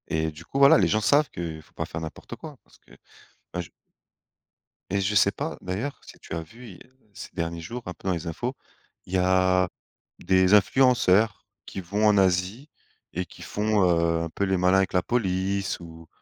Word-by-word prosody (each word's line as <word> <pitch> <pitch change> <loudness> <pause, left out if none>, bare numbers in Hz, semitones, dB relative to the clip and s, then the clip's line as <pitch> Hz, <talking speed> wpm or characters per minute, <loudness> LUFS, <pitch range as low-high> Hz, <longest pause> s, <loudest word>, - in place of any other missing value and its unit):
Et 80 0 0
du 75 +3 -13
coup, 135 - -3
voilà, 140 0 +8
les 95 -5 +3
gens 110 +5 +1
savent 145 +7 +3
que 80 -2 -6
faut - - -25
pas - - -3
faire 80 - -6
n'importe 80 -1 -8
quoi, - - -10
parce - - -23
que, - - -25 0.6
enfin, 90 - -3
j 85 - -13 1.2
et 100 - +2
je 100 +2 0
sais 100 0 +5
pas, 145 +9 -5
d'ailleurs, 100 +10 -4
si - - -14
tu - - -10
as 85 - -3
vu, 115 +10 -13
il - - -10
y 130 - -18 0.2
ces - - -9
derniers 85 -1 -3
jours, 120 +10 -6
un 90 - -5
peu, 95 - -10
dans - - +2
les 85 0 -4
infos, 120 +10 -3 0.5
il 90 - -10
y - - +3
a 90 0 +3 0.5
des 95 +1 +3
influenceurs 110 -2 +4 0.2
qui - - -7
vont 100 +4 +1
en 105 -1 +4
Asie 95 - +1 0.4
et 90 +2 -2
qui - - -16
font, 105 -1 0
heu, 85 -1 +2
un 85 - -4
peu 90 - -3
les 95 -1 +1
malins 90 +1 +4
avec 95 - +1
la 90 - +3
police 95 -3 -1
ou 80 -1 -12
95 Hz, 210 wpm, -25 LUFS, 85-105 Hz, 1.2 s, voilà